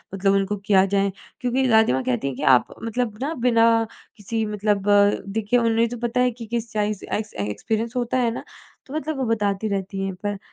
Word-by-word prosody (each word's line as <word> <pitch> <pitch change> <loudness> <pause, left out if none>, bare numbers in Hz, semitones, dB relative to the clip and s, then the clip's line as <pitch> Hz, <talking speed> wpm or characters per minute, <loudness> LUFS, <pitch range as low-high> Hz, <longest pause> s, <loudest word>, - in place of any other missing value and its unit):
मतलब 195 0 +2
उनको 200 +1 0
किया 190 -2 +5
जाए। 195 0 +2 0.3
क्योंकि 255 +1 +1
दादी 220 - +5
माँ 130 - 0
कहती 125 +2 -1
हैं 135 - -3
कि - - -5
आप - - -7
मतलब 230 -1 -2
ना 300 +4 -1
बिना 230 -1 +5 0.5
किसी 220 +2 -2
मतलब 210 -1 0 0.6
देखिए 220 +3 +2
उन्हें 230 0 +2
तो 245 - -5
पता 240 +2 -1
है 250 0 +3
कि 230 - -6
किस 235 0 -3
चाइस 210 -2 -1
एक्स 215 0 -4
अ, 100 - -2
एक्सपीरियंस 220 - -3
होता 245 +1 0
है 235 -2 +2
ना, - - -6 0.4
तो 270 - -10
मतलब 310 -1 -3
वो 265 - -1
बताती 210 -2 0
रहती 195 -1 -3
हैं, 195 - -3
पर 205 +2 -4
220 Hz, 210 wpm, -23 LUFS, 200-235 Hz, 0.6 s, किया